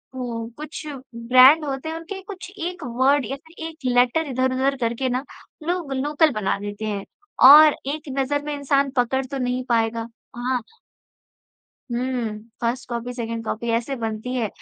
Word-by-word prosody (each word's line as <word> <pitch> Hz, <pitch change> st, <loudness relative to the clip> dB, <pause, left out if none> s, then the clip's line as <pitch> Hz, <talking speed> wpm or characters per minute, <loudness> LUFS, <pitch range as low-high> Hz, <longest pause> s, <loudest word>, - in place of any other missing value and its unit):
हुँ, 235 Hz, -3 st, -4 dB
कुछ 305 Hz, +1 st, -7 dB, 0.3 s
ब्रांड 255 Hz, +6 st, +6 dB
होते 275 Hz, +2 st, -4 dB
हैं 320 Hz, -, -4 dB
उनके 360 Hz, +4 st, -7 dB
कुछ 380 Hz, -2 st, -8 dB, 0.2 s
एक 360 Hz, 0 st, -7 dB, 0.2 s
वर्ड 275 Hz, 0 st, +4 dB
या 270 Hz, +6 st, -4 dB
फिर 320 Hz, 0 st, -9 dB
एक 320 Hz, -1 st, -10 dB
लेटर 250 Hz, +5 st, +3 dB
इधर-उधर 260 Hz, +1 st, +1 dB
करके 235 Hz, +3 st, 0 dB
ना 250 Hz, +2 st, -1 dB, 0.4 s
लोग 345 Hz, -6 st, -1 dB
लोकल 295 Hz, +3 st, +2 dB
बना 210 Hz, -3 st, 0 dB
देते 205 Hz, +1 st, -5 dB
हैं। 200 Hz, -2 st, -3 dB, 0.4 s
और 300 Hz, +1 st, +9 dB
एक 300 Hz, +1 st, -4 dB
नज़र 290 Hz, +2 st, 0 dB
में 295 Hz, 0 st, -3 dB
इंसान 280 Hz, -1 st, +1 dB
पकड़ 260 Hz, +2 st, +1 dB
तो 275 Hz, +2 st, -5 dB
नहीं 250 Hz, 0 st, -1 dB
पाएगा। 230 Hz, -1 st, +1 dB, 0.3 s
हाँ। 250 Hz, +1 st, -1 dB, 1.3 s
हुँ, 240 Hz, -3 st, -2 dB, 0.2 s
1st 240 Hz, +2 st, -1 dB
कॉपी, 240 Hz, +1 st, -4 dB
2nd 230 Hz, -1 st, -4 dB
कॉपी 230 Hz, +2 st, -3 dB
ऐसे 235 Hz, +4 st, -1 dB
बनती 225 Hz, +2 st, -3 dB
है। 235 Hz, -3 st, 0 dB
255 Hz, 160 wpm, -23 LUFS, 235-290 Hz, 1.3 s, और